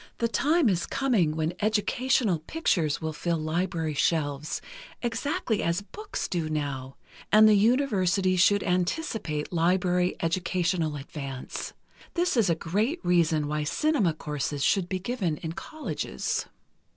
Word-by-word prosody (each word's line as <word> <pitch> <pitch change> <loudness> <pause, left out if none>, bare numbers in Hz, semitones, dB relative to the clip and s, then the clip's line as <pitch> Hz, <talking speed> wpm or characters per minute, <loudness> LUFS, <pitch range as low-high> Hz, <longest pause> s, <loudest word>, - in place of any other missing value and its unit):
"The 235 - +1
time 295 +7 +2
is 180 -5 +1
coming 210 - +1
when 160 +1 -1
educational 215 -2 +1
pictures 160 - 0
will 160 0 -3
fill 170 +2 -1
library 160 0 -1
shelves, 145 -1 0 0.4
exactly 235 -1 -1
as 170 +4 0
books 420 - -5
do 165 -3 -2
now, 140 -3 -3 0.4
and 215 +1 +8
the 215 - +6
universities 200 -5 +2
should 205 +2 +4
anticipate 180 - -1
library 180 +1 +2
educational 170 -1 0
advance. 135 -2 -6 0.4
This 350 -2 +1
is 225 -6 +3
a 165 - +3
great 210 - -1
reason 165 -4 +3
why 150 0 -1
cinema 210 - +1
courses 150 -2 -3
should 185 +1 +2
be 185 - -1
given 185 -5 -2
in 160 - -5
colleges." 300 - -4
180 Hz, 130 wpm, -27 LUFS, 155-215 Hz, 0.4 s, and